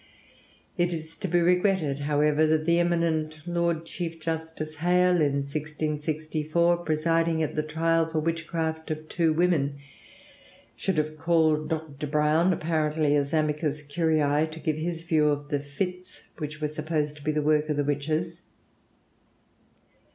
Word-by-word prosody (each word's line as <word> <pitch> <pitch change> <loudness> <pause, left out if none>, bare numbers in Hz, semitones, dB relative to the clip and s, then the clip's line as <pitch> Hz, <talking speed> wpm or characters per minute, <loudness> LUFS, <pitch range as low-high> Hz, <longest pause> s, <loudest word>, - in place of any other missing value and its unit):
It 175 0 +2
is 160 0 -6
to - - -3
be 175 0 +2
regretted, 180 -4 +2
however, 150 +1 +2
that 155 0 +2
the 170 +1 +3
eminent 165 -3 0
Lord 170 -1 0
Chief 165 -1 -5
Justice 160 -1 -4
Hale 180 +1 +3
in 145 -2 +2
1664, 155 +3 -1
presiding 165 0 +1
at 155 - -2
the 155 - 0
trial 165 +1 +1
for 160 -1 -1
witchcraft 160 0 -2
of 155 0 -4
two 165 -1 +1
women, 155 -4 +1 1.0
should 190 -4 -2
have 155 0 -1
called 160 -2 +2
Dr. 155 -2 -4
Browne, 150 +4 +3
apparently 155 -3 +1
as 140 -1 0
amicus 150 -1 0
curiæ, 155 0 +1
to 160 +1 -9
give 155 0 -1
his 165 +1 -3
view 160 -3 +2
of 145 0 -1
the 145 -2 0
fits 180 +6 -5 0.2
which 155 -1 -5
were 150 - 0
supposed 155 -1 -2
to 145 - -13
be 155 - +1
the 150 -1 0
work 150 0 +2
of 150 - 0
the 145 - +2
witches. 155 +4 -2
155 Hz, 150 wpm, -27 LUFS, 150-165 Hz, 1.0 s, the